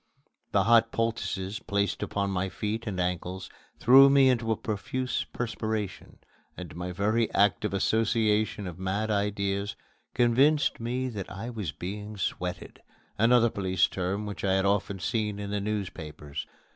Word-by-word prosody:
The - - +3
hot 115 0 +5
poultices 110 -3 -2
placed 100 0 -1
upon 100 -1 -1
my 95 0 -1
feet 110 +4 -3
and 95 -3 -3
ankles 90 +1 -3 0.3
threw 135 +3 +8
me 135 -1 +6
into 115 -3 +1
a - - +3
profuse 125 +5 -2
perspiration, 110 -4 -4 0.4
and 85 -5 -8
my 90 +1 -4
very 105 +5 +1
active 100 +1 +3
association 110 0 +1
of 90 -1 -7
mad 100 +4 -1
ideas 100 0 -1 0.4
convinced 135 +6 +3
me 125 +3 -2
that 105 -6 -6
I 115 +6 -5
was 105 -10 -4
being 105 +7 -6
"sweated" 90 -1 -4 0.4
another 115 0 +5
police 95 -2 +2
term 95 +3 -2
which 105 -1 -6
I 95 -1 +2
had 95 0 +2
often 100 0 +1
seen 105 +2 -1
in 100 0 -5
the 105 -1 -1
newspapers. 80 -8 -5
105 Hz, 145 wpm, -28 LUFS, 95-115 Hz, 0.4 s, threw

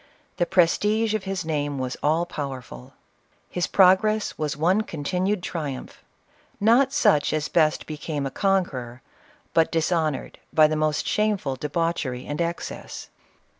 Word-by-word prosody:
The 175 - +1
prestige 210 +5 +2
of 215 -3 -2
his 190 -3 -3
name 145 -3 -2
was 130 -1 -3
all 160 +3 +2
powerful. 130 - -7 0.6
His 180 0 -1
progress 200 +3 +3
was 150 -2 -3
one 180 +7 +3
continued 180 +3 -2
triumph, 145 -8 -5 0.3
— - - -35 0.3
not 240 +6 +4
such 200 - +3
as 155 0 -1
best 155 -2 +2
became 150 -1 -4
a 135 - -3
conqueror, 135 -12 -1 0.5
but 165 -1 +3
dishonored 160 -3 -1
by 155 -2 +6
the 155 +1 +1
most 155 -1 0
shameful 210 -10 0
debauchery 150 -3 -2
and 145 +3 -3
excess. 170 0 -5
165 Hz, 135 wpm, -24 LUFS, 145-190 Hz, 0.6 s, by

